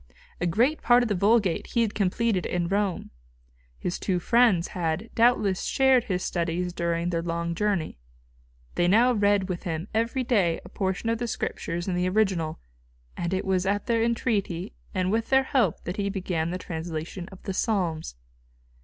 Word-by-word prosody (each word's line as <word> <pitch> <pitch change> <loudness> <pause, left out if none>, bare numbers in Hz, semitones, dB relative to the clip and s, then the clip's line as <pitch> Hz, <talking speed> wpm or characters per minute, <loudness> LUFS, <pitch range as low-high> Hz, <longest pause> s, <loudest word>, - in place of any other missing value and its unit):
A 175 - 0
great 240 - +2
part 245 0 +5
of 235 - -2
the - - +2
Vulgate 200 -1 +2
he 235 - +1
had 215 - -2
completed 205 0 0
in 175 -1 -1
Rome. 200 0 -1 0.7
His 175 - -3
two 185 -2 0
friends 200 -2 +3
had, 175 +5 -2
doubtless, 220 -5 +3
shared 265 -3 +3
his 185 -4 -2
studies 175 +1 -2
during 170 0 -1
their 165 -1 0
long 170 0 -2
journey. 190 - -1 0.7
They 175 - +2
now 235 +7 +5
read 205 -3 +2
with 180 -2 -4
him 165 +1 -4
every 230 +4 0
day 195 -9 +2
a - - -10
portion 190 +3 -2
of 230 - -1
the 240 - -2
Scriptures 175 -5 -3
in 185 - 0
the 180 +1 +1
original; 185 -6 0 0.6
and 170 0 -3
it 190 0 -1
was 190 -1 +1
at 205 +1 0
their 230 -1 +1
entreaty 210 -6 -1 0.2
and 185 -1 0
with 225 +1 0
their 265 0 +5
help 250 - +1
that 180 +4 -5
he 200 -1 0
began 180 -4 -2
the 180 - -2
translation 165 +1 -5
of 190 - -13
the 195 - -3
Psalms. 175 - -1
190 Hz, 180 wpm, -26 LUFS, 175-225 Hz, 0.7 s, part